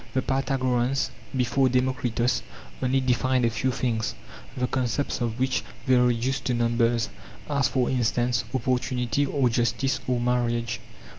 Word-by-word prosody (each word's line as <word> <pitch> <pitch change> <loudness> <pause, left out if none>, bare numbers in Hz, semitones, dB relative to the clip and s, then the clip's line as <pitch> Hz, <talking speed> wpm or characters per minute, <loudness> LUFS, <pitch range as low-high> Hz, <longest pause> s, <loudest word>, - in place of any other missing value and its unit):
The 130 - +2
Pythagoreans 130 -1 0 0.3
(before 130 +1 +2
Demo 130 +1 +2
kritos) 120 -1 0 0.4
only 130 +1 +2
defined 130 0 +2
a 115 - +2
few 120 +4 0
things, 115 -3 -1 0.4
the 125 - +1
concepts 130 +1 -1
of 120 0 -2
which 130 0 +1 0.2
they 130 - +3
reduced 125 +1 +2
to 125 - +1
numbers, 115 0 +1 0.4
as 140 -3 +2
for 125 -2 +1
instance 120 -1 +1
opportunity 125 +1 0
or 135 -2 +2
justice 120 +3 +1
or 125 -1 +1
marriage. 120 -1 0
125 Hz, 140 wpm, -26 LUFS, 120-130 Hz, 0.4 s, they